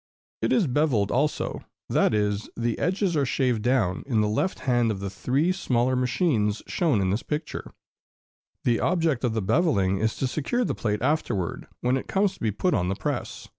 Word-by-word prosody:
It - - +1
is 220 - +4
beveled 125 -7 +1
also; 150 +4 -1 0.2
that - - +2
is, 105 -1 0
the 120 -1 -1
edges 185 -1 0
are 145 - +2
shaved 125 -3 +1
down 110 -7 +1
in 115 -6 +1
the 105 - +2
left 110 - -1
hand 120 -3 +2
of 105 -3 -2
the 100 -1 -4
three 140 - +1
smaller 130 -8 +1
machines 125 - +1
shown 155 - +1
in 95 -1 +1
this 105 - 0
picture: 150 +1 -4 0.9
the 120 -2 +2
object 165 -7 +1
of 120 -3 +1
the 110 - 0
beveling 100 - +2
is 110 0 0
to - - -2
secure 155 - -1
the - - -1
plate 105 -2 -2
afterward, 120 - -1
when 125 +2 +2
it - - -6
comes 195 0 +1
to - - -17
be 110 - 0
put 110 - 0
on 90 -3 +1
the 95 - 0
press. - - -4
125 Hz, 195 wpm, -26 LUFS, 105-155 Hz, 0.9 s, is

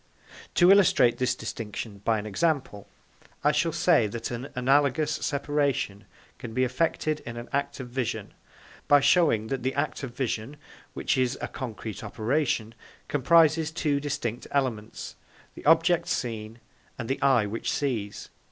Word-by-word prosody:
To 175 +1 +6
illustrate 165 -11 +5
this 125 -1 +1
distinction 105 -1 -6
by 115 0 +2
an 105 - -5
example, 130 -3 -1 0.6
I - - +5
shall - - +1
say - - +3
that 115 +3 -5
an 120 +3 -4
analogous 140 +3 +2
separation 140 -9 -1 0.3
can 115 -4 -8
be 130 - +2
effected 155 +3 0
in 120 0 -8
an 120 - -7
act 140 0 -1
of 125 -2 -6
vision, 120 -4 -3 0.5
by 145 - +7
showing 140 -7 +3
that 135 -2 -2
the 130 +2 -2
act 140 +2 -1
of 125 -3 -7
vision, 130 +1 -3 0.4
which - - 0
is 130 +1 +1
a - - -3
concrete 110 -4 -6
operation, 115 -1 -1 0.4
comprises 160 +2 +4
two 150 -3 0
distinct 125 -5 -3
elements: 120 -6 -3 0.4
the - - -12
object 165 +2 +4
seen 115 -1 -3 0.4
and 120 - -5
the 135 +2 -2
eye 130 -6 +4
which 105 +3 -3
sees. 115 -8 -3
130 Hz, 150 wpm, -27 LUFS, 115-145 Hz, 0.6 s, by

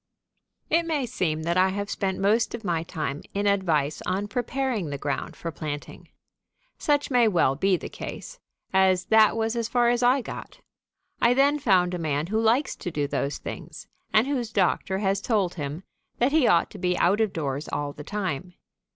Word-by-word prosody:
It 330 +1 +3
may 300 -5 0
seem 165 -10 -2
that 170 +2 0
I 185 +1 +4
have 200 +1 -3
spent 190 -1 -1
most 220 +4 +2
of 230 - -9
my 170 -4 0
time 155 -4 -4
in 200 +1 0
advice 165 -8 +1
on 190 +3 -1
preparing 245 - -2
the 140 - -3
ground 140 0 -3
for 165 - -5
planting. 150 -2 -7 0.7
Such 290 -1 +1
may 245 -2 +5
well 170 -9 +2
be 190 +5 +2
the - - -7
case, - - -8 0.3
as 190 -1 +3
that 220 0 +6
was 225 +1 0
as 230 -2 -1
far 240 -1 +3
as 240 0 +1
I 250 +2 +4
got. - - -8 0.6
I 240 +1 +4
then 285 +2 +3
found 185 -8 +3
a 180 - -3
man 150 -2 -1
who 220 +5 0
likes 235 +6 +2
to - - -5
do 145 -3 -1
those 140 0 -2
things - - -8 0.3
and 215 +2 +4
whose 260 -5 -2
doctor 190 -1 +1
has 195 0 0
told 200 -7 +1
him 150 +2 -5 0.3
that 245 +3 +2
he 305 -5 +4
ought 170 - +3
to - - -10
be 180 -1 0
out 200 +5 +3
of 215 -3 +1
doors 145 -3 -3
all 145 -1 -3
the 150 - -9
time. 185 -2 -4
195 Hz, 195 wpm, -26 LUFS, 165-235 Hz, 0.7 s, that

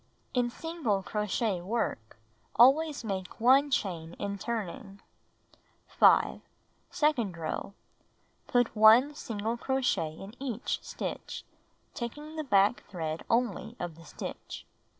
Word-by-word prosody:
(In 245 -2 +1
single 245 - -2
crochet 210 -2 -1
work, 175 - -3 0.4
always 285 +4 +5
make 190 -4 -5
1 265 +5 +5
chain 175 -10 -2
in 200 0 -4
turning.) 205 -2 -5 0.9
5. - - +4 0.5
Second 240 - +1
row: 165 +4 -4 0.7
Put 245 -3 +2
1 225 +7 +7
single 225 -3 -3
crochet 245 - 0
in 195 +5 -10
each 245 -4 -2
stitch, - - -6 0.5
taking 295 +6 -6
the 310 - -3
back 205 -3 +3
thread 160 -3 -4
only 230 -1 0
of 175 -2 -4
the 165 +1 -15
stitch. - - -8
225 Hz, 110 wpm, -30 LUFS, 195-255 Hz, 0.9 s, 1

